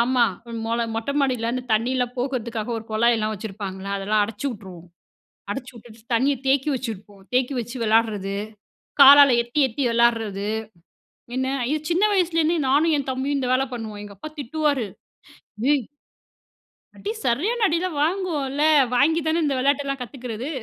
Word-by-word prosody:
ஆமா! 245 +1 +3 0.4
மொல 230 +1 0
மொட்டை 225 +5 -2
மாடியில 250 -4 0
அந்த 255 0 -2
தண்ணியெல்லாம் 245 +2 0
போகுறதுக்காக 240 -3 -3
ஒரு 220 - -10
குழாய்லாம் 220 -1 +2
வச்சுருப்பாங்கல்ல! 195 -2 -6
அதெல்லாம் 210 +2 +1
அடைச்சிவுட்டுருவோம். 205 -6 -7 0.6
அடச்சிவுட்டுட்டு 235 -1 -8
தண்ணியை 270 +4 +2
தேக்கி 275 +2 +2
வச்சிருப்போம். 210 -5 -7
தேக்கி 255 +2 +2
வச்சு 240 +2 -7
விளையாடுறது, 215 -3 +1 0.7
காலால 280 0 +10
எத்தி 240 +5 -3
எத்தி 250 +5 -5
விளாடுறது. 225 -4 +1 0.9
என்ன, 260 0 0 0.2
அய்யோ! 300 +6 0
சின்ன 350 +4 +2
வயசுலேருந்தே 335 -3 +2
நானும் 305 +4 +3
என் 275 -2 -3
தம்பியும் 275 +2 -1
இந்த 250 -1 -2
வேலை 265 +1 +2
பண்ணுவோம். 215 -3 -6
எங்க 205 -1 -11
அப்பா 310 - -7
திட்டுவாரு. 285 -3 -1 0.8
டேய் 275 -4 +2 1.1
அடி 425 - -4
சரியான 415 - +1
அடி 335 -3 +1
எல்லாம் 360 -6 -3
வாங்குவோம்ல! 305 -5 -1 0.3
வாங்கி 320 +5 +3
தானே 325 +1 +1
இந்த 285 -2 +1
விளையாட்டு 280 +2 +1
எல்லாம் 275 -1 -3
கத்துக்குறது. 245 +1 -6
250 Hz, 140 wpm, -23 LUFS, 225-285 Hz, 1.1 s, காலால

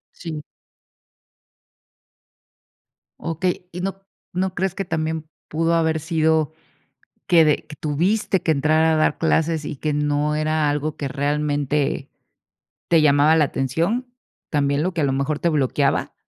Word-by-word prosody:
Sí. 160 -3 -6 2.8
Okey, 180 +2 -2
¿y 180 +1 -6
no 195 +1 -4 0.3
no 185 0 -1
crees 190 0 -1
que 195 - -3
también 160 -1 -2 0.2
pudo 165 +2 +1
haber 160 -1 +2
sido 160 -1 +1 0.7
que, 170 -3 +6
de 150 - +4
que 150 - -9
tuviste 185 +6 0
que 160 - +1
entrar 155 +2 +3
a 160 -1 +3
dar 155 - +2
clases 160 -1 +1
y 150 - -4
que 150 +2 -2
no 150 +1 0
era 155 -1 +1
algo 150 +1 -2
que 140 - -3
realmente 145 0 -1 0.8
te 165 -2 +4
llamaba 145 +2 +5
la 155 - +5
atención, 170 - -1 0.4
también 140 -1 +1
lo 185 - 0
que 165 - -1
a - - +2
lo 135 - +1
mejor 140 +2 -1
te 170 - +2
bloqueaba? 140 -2 +1
155 Hz, 145 wpm, -22 LUFS, 145-165 Hz, 2.8 s, que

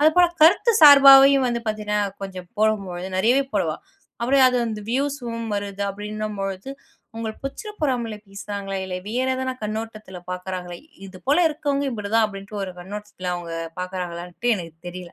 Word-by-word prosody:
அது 305 +1 +6
போலக் 345 -1 +4
கருத்து 385 +8 +6
சார்பாவும் 275 -2 +9
வந்து 240 -1 -1
பார்த்தீங்கன்னா, 210 -1 -1 0.2
கொஞ்சம் 185 -2 -7
போடும்போது 195 -4 0
நெறையவே 240 +8 +3
போடுவா. - - 0 0.4
அப்படியே 265 +3 +3
அது 250 - 0
வந்து 215 -2 -4
வியூஸ்யும் 245 -4 -2
வருது 200 0 -4
அப்படின்னும் 210 +1 -5
பொழுது. 195 +5 -4 0.4
அங்க 225 -1 -4
பொச்சிரப்புறாமல 275 - -3
பேசுறாங்களே 200 0 -5
இல்ல. 185 -1 -5
வேற 250 +4 -1
எதான 260 0 -2
கண்ணோட்டத்துல 215 -3 -5
பாக்குறாங்கள, 180 -1 -5 0.3
இது 185 -1 -12
போல 285 +4 +3
இருக்கவங்க 285 -2 -2
இப்படி 210 -4 -5
தான் 225 - +5
அப்படினுடு 200 +1 -9
ஒரு 185 - -7
கண்ணோட்டத்துல 190 -1 -6
அவங்க 175 -1 -6 0.3
பாக்குறாங்களான்ட்டு 180 +3 -5
எனக்குத் 165 -3 -9
தெரியல. 175 -1 -9
215 Hz, 145 wpm, -23 LUFS, 190-260 Hz, 0.4 s, சார்பாவும்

